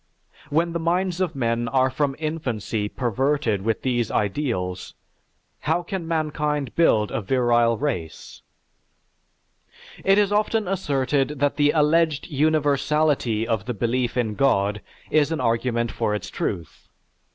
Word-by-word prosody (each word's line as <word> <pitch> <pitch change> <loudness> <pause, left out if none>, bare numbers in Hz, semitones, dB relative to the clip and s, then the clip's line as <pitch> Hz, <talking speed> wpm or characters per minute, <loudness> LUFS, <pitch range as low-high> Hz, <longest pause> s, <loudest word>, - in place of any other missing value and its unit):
When 165 +3 +1
the 170 - -1
minds 180 +2 0
of 180 -5 -1
men 120 -2 0
are 130 +2 +2
from 135 +1 -1
infancy 125 -9 -3
perverted 125 -3 0
with 110 +2 -1
these 120 -3 0
ideals, 100 -5 -2 0.7
how 170 +2 +2
can 175 -1 -5
mankind 150 -4 -1
build 110 -11 +3
a - - -2
virile 120 0 +2
race? 115 - -4 1.6
It 195 +1 +4
is 205 -1 +3
often 210 0 +1
asserted 145 -5 0
that 145 +1 +1
the 145 -1 +4
alleged 155 0 +2
universality 145 -5 +1
of 110 -2 -1
the 125 -1 -3
belief 120 +2 -1
in 115 -3 0
God 105 -5 +1 0.3
is 155 0 +3
an 160 - -1
argument 115 0 0
for 105 - -1
its 105 - -6
truth. 85 -5 -4
135 Hz, 130 wpm, -23 LUFS, 115-155 Hz, 1.6 s, It